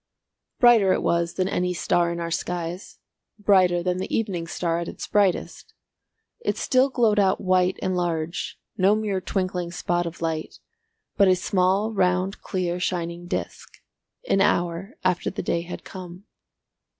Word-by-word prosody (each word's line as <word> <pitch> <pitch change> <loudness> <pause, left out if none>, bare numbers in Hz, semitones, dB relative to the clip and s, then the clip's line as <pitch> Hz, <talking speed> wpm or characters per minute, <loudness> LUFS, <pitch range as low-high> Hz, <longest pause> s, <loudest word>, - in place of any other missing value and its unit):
Brighter 225 -6 +6
it - - -1
was 170 0 0
than 185 - 0
any 180 -1 -1
star 170 0 +1
in 170 - -4
our 170 0 -3
skies; 175 +2 -4 0.4
brighter 185 -4 +3
than 180 0 0
the 190 - -4
evening 185 -7 -2
star 170 0 -1
at 170 - -4
its - - -6
brightest. 200 -4 0 0.6
It 475 - -2
still 260 +1 +3
glowed 225 -5 +2
out 195 -1 +3
white 185 -1 +2
and 185 0 0
large, 170 -1 -2 0.2
no 195 +3 +5
mere 205 -3 -1
twinkling 185 -2 -2
spot 175 0 -1
of 170 - -8
light, 160 -1 -3 0.6
but 200 - +6
a 185 - +5
small 190 +4 +1
round 185 0 +1
clear 180 -2 -2
shining 175 -1 -3
disc, - - -5 0.5
an 195 - +3
hour 175 - 0
after 185 -2 +1
the - - -5
day 170 - 0
had 175 +1 -8
come. 180 0 -9
180 Hz, 155 wpm, -24 LUFS, 170-195 Hz, 0.6 s, Brighter